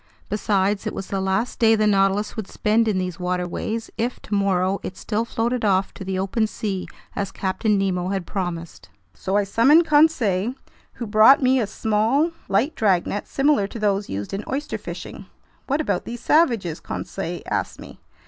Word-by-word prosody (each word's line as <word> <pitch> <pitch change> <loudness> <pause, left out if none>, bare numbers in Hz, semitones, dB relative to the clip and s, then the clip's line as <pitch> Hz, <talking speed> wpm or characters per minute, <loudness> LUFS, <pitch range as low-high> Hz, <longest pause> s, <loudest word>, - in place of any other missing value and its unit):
Besides, 205 -1 0
it - - -4
was 195 - -6
the 195 -1 -1
last 190 +5 -1
day 225 -1 +5
the 215 0 +2
Nautilus 195 0 +2
would 220 -4 -5
spend 225 +2 +1
in 210 -3 +1
these 180 -2 -3
waterways, 180 +5 -3
if, 240 +2 -1
tomorrow, 195 -2 0
it 185 - -7
still 220 +1 -2
floated 235 +1 -1
off 195 -2 +2
to - - -8
the 190 0 -3
open 195 +4 0
sea 200 -3 -4 0.3
as 200 -1 -2
Captain 200 +3 0
Nemo 185 -2 0
had 190 -2 -2
promised. 175 -4 -5 0.2
So 195 +1 -1
I 205 - +3
summoned 270 - +5
Conseil, 255 - +3 0.4
who 240 - -6
brought 220 +6 +6
me 260 +1 +4
a 220 - 0
small, 220 +10 +1 0.2
light 240 +11 +2
dragnet 200 -1 0
similar 275 -7 +2
to 215 - -8
those 205 -2 0
used 100 - -5
in 200 +2 -3
oyster 290 +3 -3
fishing. - - -8 0.4
"What 280 +3 0
about - - -1
these 235 0 -6
savages?" 235 - +2
Conseil - - -5
asked - - -3
me. - - -12
205 Hz, 175 wpm, -23 LUFS, 190-230 Hz, 0.4 s, brought